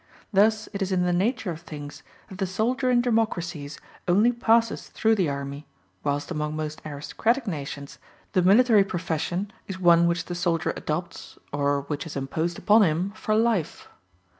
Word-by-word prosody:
Thus 215 +2 +3
it 200 - -4
is 195 0 -1
in 180 -1 +2
the 180 0 +1
nature 200 +2 0
of 160 -1 -7
things 145 -3 -9 0.3
that 190 - -11
the 190 - 0
soldier 240 +7 0
in 245 -1 +4
democracies 175 - -1 0.3
only 205 +7 +4
passes 230 -1 +2
through 225 0 +2
the 190 -8 +1
army, 140 +1 -5 0.4
whilst 145 +3 -2
among 150 -1 -2
most 155 0 -4
aristocratic 220 - -1
nations 140 -6 -6 0.3
the 185 - +4
military 210 +3 +6
profession 175 +2 -3
is 190 - -5
one 170 -2 +5
which 170 0 0
the 175 - -5
soldier 175 -2 0
adopts, 170 +4 -5 0.2
or 145 0 +1
which 145 +3 -5
is 160 - -8
imposed 160 +5 -2
upon 215 +3 +5
him, 180 +1 +1
for 215 0 -1
life. 220 -7 0
180 Hz, 165 wpm, -25 LUFS, 155-215 Hz, 0.4 s, military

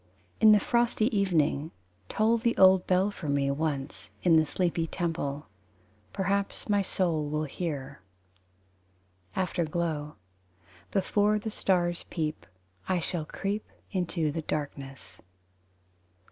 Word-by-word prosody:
In 220 -1 +8
the 210 - +7
frosty 235 +1 +1
evening 160 -6 +1 0.4
Toll 225 +2 +2
the 235 0 0
old 190 -1 +6
bell 185 +2 +3
for 160 -7 -6
me 140 -1 +2
Once, 140 -2 -3
in 170 -3 +5
the 160 -1 +4
sleepy 170 0 0
temple. 160 -5 -3 0.7
Perhaps 200 +1 -1
my 205 -2 +3
soul 170 -6 0
will 150 +1 -1
hear. 140 - -5 1.3
Afterglow: 165 -4 -1 0.7
Before 205 +2 +2
the 215 +1 -4
stars 175 -4 0
peep 155 -2 -3 0.4
I 185 -1 +2
shall 165 -1 -3
creep 200 +6 -3
out - - -29
into 170 -5 -1
darkness. 140 -3 -5
175 Hz, 115 wpm, -28 LUFS, 150-195 Hz, 1.3 s, In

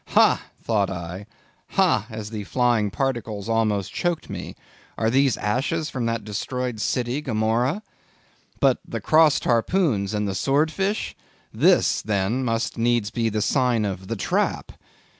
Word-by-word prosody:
Ha! - - +5 0.2
thought 105 -4 0
I, 90 +2 -6 0.5
ha, 180 - +3
as 110 -1 -6
the 105 -2 -4
flying 120 -4 +2
particles 115 -3 -3
almost 110 -4 0
choked 175 -3 -2
me, - - -6 0.4
are 110 0 +1
these 135 0 +3
ashes 135 +9 -1
from 125 -3 -2
that 115 -1 -2
destroyed 125 +3 -3
city, 125 +5 -1
Gomorrah? 120 - 0 0.8
But - - +3
"The - - -5
Crossed 155 -1 +4
Harpoons," 115 - +1
and 105 0 -1
"The 100 - -2
Sword 140 +10 +1
Fish?"—this, 195 +6 0
then 105 +5 0
must 115 -1 -1
needs 115 -3 +1
be 115 -1 0
the 105 -1 -1
sign 125 -5 +2
of 95 -1 -4
"The 115 - -2
Trap." 100 - -1
115 Hz, 140 wpm, -24 LUFS, 105-130 Hz, 0.8 s, Ha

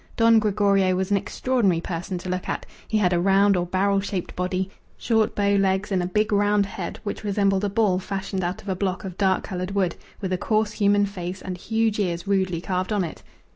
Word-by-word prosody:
Don 230 -1 +6
Gregorio 200 -3 +2
was 190 +2 -2
an 200 - +4
extraordinary 200 -2 0
person 175 +1 -4
to 175 - -8
look 185 0 -3
at; - - -3 0.2
he 220 - +1
had 185 -4 +2
a 175 - +2
round 195 +2 +4
or 175 -1 0
barrel 195 +2 +2
shaped 195 -2 -4
body, 185 +1 -2 0.3
short 225 -2 +1
bow 200 0 +2
legs, 195 +1 +1
and 185 -2 +2
a 175 - -1
big 210 +3 0
round 205 0 +3
head, 190 -3 -6
which 205 - -5
resembled 200 -1 +1
a 205 - +1
ball 200 -3 +2
fashioned 195 0 -3
out 175 +1 -3
of 200 - -7
a 190 - 0
block 185 0 -2
of 185 -3 -6
dark 190 -1 +1
coloured 185 0 -4
wood 185 -4 +1 0.2
with 190 -3 -2
a 180 - -1
coarse 215 0 +1
human 205 -1 +3
face 185 -2 -5
and 185 -1 -5
huge 220 +3 0
ears 175 -4 -1
rudely 190 -4 +1
carved 185 +2 -2
on 205 -3 +1
it. 165 - -6
195 Hz, 220 wpm, -24 LUFS, 185-205 Hz, 0.3 s, Don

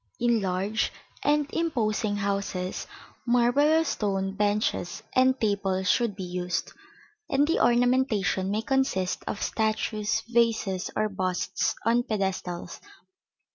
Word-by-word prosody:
In 235 -2 +2
large 195 +3 0 0.3
and 295 0 +2
imposing 220 -10 0
houses 200 -2 -2 0.4
marble 245 +4 +3
or 320 +1 +4
stone 195 -8 -1
benches 205 -3 0
and 260 +1 +4
tables 195 -3 +1
should 235 -5 +1
be 195 - -6
used, 180 0 -3 0.6
and 280 +1 +3
the 330 - +1
ornamentation 240 -6 +2
may 215 +2 -1
consist 230 -8 0
of 205 - -3
statues, 220 0 0
vases, 225 -5 +1
or 215 - +1
busts 185 -3 -1
on 235 +1 +4
pedestals 190 -5 -3
(see - - -9
Plate 405 - -20
XXIX). - - -18
215 Hz, 130 wpm, -27 LUFS, 195-240 Hz, 0.6 s, or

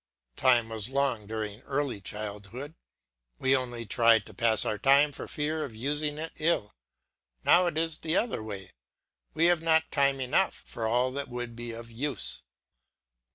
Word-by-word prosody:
Time 120 - +3
was 110 0 -4
long 135 -6 0
during 110 0 -4
early 135 -7 -2
childhood; 105 +7 -6 0.6
we 130 +1 +3
only 120 -3 -3
tried 115 0 +4
to 110 - -13
pass 110 +1 +3
our 105 - -1
time 140 +2 +5
for - - -6
fear 155 +1 -2
of 115 - -7
using 145 +5 -1
it 160 +1 -5
ill; 155 -10 +1 0.7
now 180 +1 +5
it 170 - -2
is 165 -1 -1
the 160 +1 -1
other 230 - 0
way; 100 -3 -7 0.6
we 165 - +4
have 175 -2 +4
not 160 -1 +2
time 140 -1 +2
enough 135 +9 0
for 115 -1 -4
all 125 +3 +2
that 140 +1 -4
would 120 -1 -5
be 120 0 -6
of 115 0 -9
use. 135 +5 0
130 Hz, 165 wpm, -29 LUFS, 115-150 Hz, 0.7 s, time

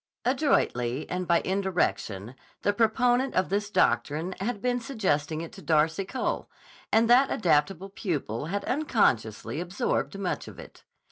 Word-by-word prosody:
Adroitly 155 - +1
and 180 0 -2
by 170 - +3
indirection 180 - -1 0.3
the 205 - +2
proponent 245 +4 +2
of 185 - +1
this 205 +2 -1
doctrine 150 +4 +1
had 205 +2 -2
been 245 +3 0
suggesting 160 - -1
it 165 - -7
to - - -12
Darcy 160 +4 +2
Cole, 255 +6 -3 0.4
and 225 +1 +4
that 255 +3 +6
adaptable 180 +2 +1
pupil 150 - -3
had 200 +4 -3
unconsciously 155 - 0
absorbed 190 +3 -2
much 195 -2 -3
of - - -11
it. - - -13
190 Hz, 140 wpm, -27 LUFS, 155-225 Hz, 0.4 s, that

